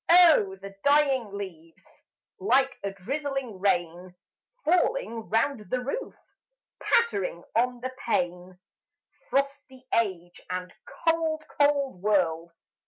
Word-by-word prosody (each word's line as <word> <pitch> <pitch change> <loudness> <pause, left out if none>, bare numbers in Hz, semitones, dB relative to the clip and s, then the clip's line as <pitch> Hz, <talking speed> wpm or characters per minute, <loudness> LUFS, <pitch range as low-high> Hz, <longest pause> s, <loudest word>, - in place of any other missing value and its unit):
Oh, 330 - +6
the 195 0 -9
dying 280 -6 +3
leaves, 175 -5 -9 0.4
Like 270 -8 +2
a 200 - -1
drizzling 260 +2 -4
rain, 180 -1 -1 0.5
Falling 345 - +1
round 225 -1 0
the 255 - 0
roof 275 - -4 0.6
Pattering 195 - +1
on 245 +1 +1
the 255 +1 -4
pane! 180 -3 -1 0.7
Frosty 275 -1 -2
Age 185 -6 -1
and 180 0 -4 0.3
cold, 325 -1 +1
cold 280 -8 +2
World! 170 -5 +1
230 Hz, 105 wpm, -27 LUFS, 185-285 Hz, 0.7 s, Oh